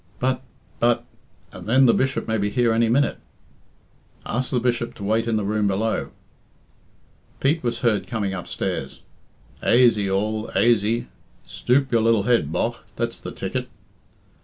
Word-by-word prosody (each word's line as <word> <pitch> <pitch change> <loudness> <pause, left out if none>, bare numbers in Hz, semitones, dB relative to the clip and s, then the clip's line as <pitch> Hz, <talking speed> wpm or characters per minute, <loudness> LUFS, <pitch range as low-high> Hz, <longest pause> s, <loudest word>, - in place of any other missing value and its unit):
"But 130 0 0 0.4
but 120 0 +2 0.5
and 90 0 -10
then 130 +3 +5
the 115 - +6
Bishop 135 0 0
may 110 -1 0
be 100 +1 0
here 120 0 +2
any 115 0 +2
minute." 140 +4 +2 1.1
"Ask 125 +2 -2
the 125 - +1
Bishop 120 -1 -1
to 100 - -9
wait 110 +3 +1
in 115 - +1
the 105 - 0
room 105 +1 0
below." 105 +3 -1 1.3
Pete 155 +4 +1
was 120 -1 -2
heard 115 -5 +1
coming 105 -5 -2
upstairs. 90 -2 -4 0.6
"Aisy 115 -5 +4
all, 110 +3 -1
aisy! 115 0 +2 0.4
Stoop 135 +2 +1
your 115 -2 +3
lil 115 -2 +3
head, 115 -10 +2
bogh. - - -1 0.2
That's - - -3
the - - -6
ticket!" - - -4
115 Hz, 150 wpm, -23 LUFS, 105-120 Hz, 1.3 s, the